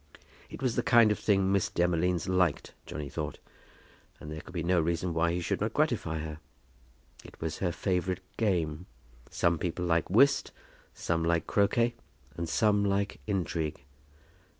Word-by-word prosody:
It - - -8
was 125 -3 +1
the - - +2
kind 115 -2 +5
of 105 - -1
thing 95 -2 +2
Miss 100 -2 +2
Demolines 90 -1 +1
liked, 90 -5 +1
Johnny 75 -2 -5
thought; 75 +1 -4 0.8
and 75 - -9
there 80 0 -6
could - - -13
be 85 - -1
no 90 0 +3
reason 85 +2 -1
why 80 +1 +2
he 90 +1 -1
should - - -2
not - - -1
gratify 80 0 0
her. 80 0 -6 0.8
It - - -14
was 80 -1 -4
her 90 -3 0
favourite 90 0 -1
game. 90 -5 -1 0.4
Some 85 -1 +1
people 90 +1 -2
like 85 -1 +1
whist, 140 +9 +4 0.4
some 85 -1 -1
like 85 -1 +1
croquet, 115 +4 +2 0.4
and 85 -1 -4
some 105 +3 +3
like 100 0 0
intrigue. 85 - -2
90 Hz, 160 wpm, -29 LUFS, 80-100 Hz, 0.8 s, kind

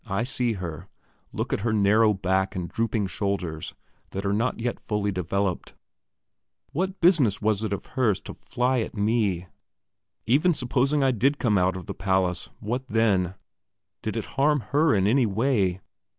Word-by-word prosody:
I 100 -1 -2
look - - +1 0.3
at 110 - -2
her 85 -4 -6 0.4
look - - -3
at - - 0
her 110 +2 0
narrow 105 +1 +4
back 95 0 0
and 90 -2 -3
drooping 115 -1 -1
shoulders, 90 -4 -3 0.3
that 95 +1 -5
are 100 - +1
not 115 +4 0
yet 120 +1 -2
fully 105 -1 -1
developed. 95 +1 -2 1.0
What 185 +5 -2
business 155 - +4
was 110 0 0
it 110 - -2
of 100 -1 -3
hers 115 -7 +1
to - - -8
fly 125 +1 -1
at 115 - -4
me? 100 -4 +1 0.8
Even 150 +9 +3
supposing 135 +2 +1
I 135 - +4
did 135 +5 +2
come 110 -7 +1
out 95 +1 +1
of 90 - -8
the - - -5
palace, 95 -2 0
what 125 +5 -3
then? 100 -6 +1 0.7
Did - - -3
it - - -3
harm 145 0 +1
her 150 -1 +4
in 95 -1 +2
any 120 +3 +3
way? 100 -4 +1
105 Hz, 170 wpm, -25 LUFS, 95-125 Hz, 1.0 s, narrow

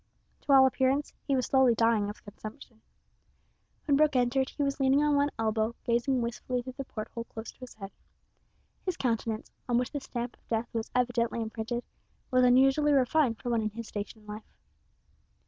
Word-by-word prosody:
To 290 - -2
all 265 -1 +8
appearance 265 +2 +1
he 275 - +2
was 255 - +1
slowly 265 -3 +4
dying 225 -3 +2
of 205 - -9
consumption. 220 +2 -11 1.0
When 285 - +3
Brooke 300 -1 +3
entered 255 +2 +2
he 290 - -3
was 275 0 -1
leaning 270 +2 +4
on 295 -1 +3
one 285 0 +3
elbow, 220 +1 0
gazing 240 +2 +1
wistfully 245 +1 -3
through 255 +1 -7
the 275 - -5
port 215 -3 -6
hole 230 0 -6
close 220 0 -8
to - - -30
his 255 -1 -10
head. 195 -2 -8 0.9
His 370 -3 -2
countenance, 225 -3 -2 0.2
on 240 - +3
which 245 0 -1
the 290 - -3
stamp 240 -1 -5
of - - -36
death 225 +1 -1
was 225 -1 -3
evidently 240 -2 +1
imprinted, 225 +2 -3 0.5
was 255 0 +4
unusually 270 +4 +5
refined 265 -2 +3
for 245 - -3
one 230 -1 +2
in 215 - -1
his 225 +1 -8
station 210 +1 -6
in - - -21
life. 210 +1 -9
245 Hz, 190 wpm, -29 LUFS, 225-265 Hz, 1.0 s, all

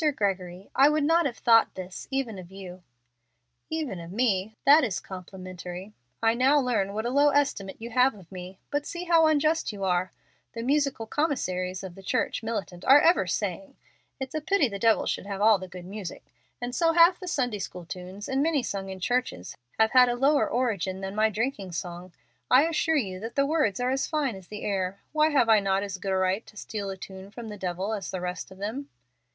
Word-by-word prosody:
"Mr. 300 -3 +2
Gregory, 190 -2 -2
I 275 +2 +7
would 300 0 +1
not 330 +1 +3
have 240 - -6
thought 230 -1 +4
this 185 0 -7
even 265 -7 -2
of 175 -1 -11
you." 185 -2 -9 0.9
"Even 305 - -3
of 170 0 -9
me! 215 -2 0
That 290 +3 +7
is 210 -7 -1
complimentary. 185 +1 -8 0.3
I 225 0 +4
now 265 +5 +4
learn 220 -7 0
what 220 +1 -2
a 240 - 0
low 285 +2 +5
estimate 275 -9 0
you 235 +2 -7
have 250 +1 +3
of 190 -4 -16
me. 185 0 -8
But 290 0 -1
see 345 0 -5
how 335 -2 +5
unjust 310 0 +2
you 200 -2 -7
are. 180 -1 +1 0.4
The 230 - -5
musical 275 -3 +1
commissaries 185 - -1
of 190 -2 -7
the 195 - -12
church 190 - -1
militant 205 -6 -4
are 275 +2 +8
ever 325 - +4
saying, 210 +10 -3 0.4
'It's 265 -1 -5
a 310 - -2
pity 330 -2 +2
the 200 -3 -6
devil 225 0 +3
should - - -2
have 200 -1 -4
all 215 -1 +5
the 185 - -7
good 180 -1 -10
music,' 195 -6 -8 0.3
and 245 0 -4
so 330 +5 +2
half 345 +2 +6
the 365 - -8
Sunday 245 - -1
school 180 -2 -6
tunes, 185 +4 -8
and 265 +1 0
many 300 -3 +1
sung 195 -4 -4
in 190 0 -7
churches, 245 - -2 0.2
have 220 0 +4
had 250 -1 +6
a 240 - 0
lower 280 +4 +3
origin 200 -6 -1
than 195 0 -4
my 215 +1 +3
drinking 215 -4 -3
song. 175 +1 -6 0.4
I 255 +3 +7
assure 320 0 +1
you 190 -8 -2
that 225 +3 -7
the 275 - +3
words 285 -10 +1
are 250 +1 +1
as 270 +1 0
fine 295 -8 -1
as 190 -2 -12
the 210 0 -7
air. 195 -1 -2
Why 310 0 +3
have 275 -6 +3
I 220 -2 +6
not 195 0 +1
as 195 -2 -5
good 195 - -3
a 190 - +2
right 185 +3 +1
to 210 - -15
steal 205 -2 -5
a 190 - -5
tune 190 0 -10
from 225 +1 -8
the 210 - -6
devil 190 +3 -3
as 200 -4 -4
the 185 - -3
rest 180 +1 -4
of 190 - -13
them?" 225 +8 -5
215 Hz, 220 wpm, -27 LUFS, 190-270 Hz, 0.9 s, are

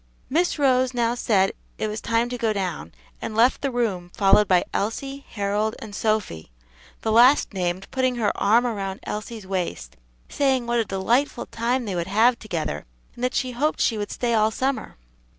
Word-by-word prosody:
Miss 340 +4 +1
Rose 260 -3 +2
now 235 -1 +1
said 205 -6 +2 0.3
it 215 - -1
was 215 +1 -4
time 230 +1 +1
to 245 - -4
go 225 -2 +1
down 180 - -3
stairs, - - -29
and 215 - -5
left 235 +4 +4
the 275 - 0
room, 215 -8 -1
followed 200 +1 +5
by 180 -2 +4
Elsie, 270 +6 -3
Harold, 210 +1 -1
and 215 -2 -9
Sophy, 205 - -1 0.5
the 220 - -1
last 245 +2 +5
named 185 0 -2
putting 255 -1 +1
her 220 -4 0
arm 230 +5 +3
around 195 -4 -3
Elsie's 215 0 -6
waist, 180 - -4 0.3
saying 265 -3 +1
what 235 0 +1
a 225 - +1
delightful 225 +9 0
time 240 +2 -1
they 200 - -3
would 170 -1 -2
have 225 +5 +3
together, 160 - -4 0.3
and 240 - -9
that 250 - 0
she 255 -1 0
hoped 290 +6 0
she 225 -3 +1
would 205 -1 -3
stay 240 -1 -1
all 215 -1 +4
summer. 265 +4 -2
220 Hz, 185 wpm, -24 LUFS, 195-245 Hz, 0.5 s, followed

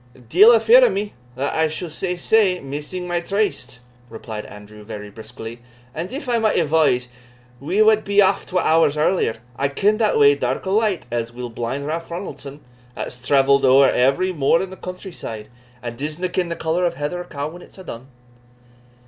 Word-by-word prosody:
"Deil 205 - +7
a 230 - +6
fear 230 +4 +6
o' 250 - +6
me 205 +2 -3 0.2
(that 135 +2 -2
I 160 0 +2
suld 155 +2 -5
say 180 +3 -2
sae) 185 0 +2
missing 150 +6 -6
my 175 0 0
tryste," 200 - -2 0.3
replied 110 -1 -7
Andrew, 105 +1 -13
very 105 -1 -8
briskly; 115 +2 -9 0.3
"and 170 +4 -5
if 280 0 -6
I 240 -1 +1
might 220 -1 +1
advise, 150 -6 +2 0.5
we 185 +10 +2
wad 215 0 +4
be 200 +1 +1
aff 195 - +3
twa 180 -1 0
hours 160 -2 +3
earlier. 155 -6 +1 0.2
I 140 - +1
ken 200 +10 +1
the 215 -2 +2
way, 145 0 +6
dark 130 +1 -2
or 190 - -2
light, 210 -3 +1
as 115 -1 -2
weel 120 0 -7
as - - -16
blind 120 +5 -4
Ralph 165 +2 -4
Ronaldson, 150 -5 -7 0.3
that's 125 - -6
travelled 140 +2 +3
ower 135 +1 +6
every 160 +9 +2
moor 150 +1 +2
in 190 - -7
the - - -8
country 185 +1 -8
side, 110 -9 -8 0.3
and 120 0 -6
disna 155 +5 -4
ken 180 -2 0
the 170 - -3
colour 165 +3 -1
of 170 -1 -1
a - - -16
heather 165 +5 -3
cowe 145 -4 -5
when 175 +3 -12
a's - - -16
dune." 130 -10 -9
160 Hz, 200 wpm, -21 LUFS, 130-185 Hz, 0.5 s, Deil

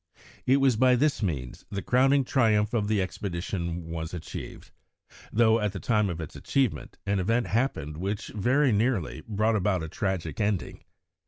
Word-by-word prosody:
It 130 +2 +5
was 135 -4 +3
by 130 +1 +5
this 145 +2 +1
means 70 - -3
the 100 -1 -4
crowning 135 +2 +4
triumph 110 -5 +2
of 105 -3 +1
the 105 -1 +1
expedition 85 -2 -4
was 80 +1 -5
achieved, 85 - -8 0.6
though 115 0 +4
at 105 -2 -1
the 95 - -5
time 105 -2 +1
of 85 -2 -4
its 80 - -7
achievement 135 -6 -1
an 100 -1 +1
event 115 +6 +1
happened 90 - -1
which 100 +4 -3
very 130 +6 +2
nearly 110 - 0
brought 110 +1 +1
about 95 -4 +1
a - - -4
tragic 85 -3 -3
ending. 105 -3 -2
105 Hz, 165 wpm, -27 LUFS, 90-120 Hz, 0.6 s, It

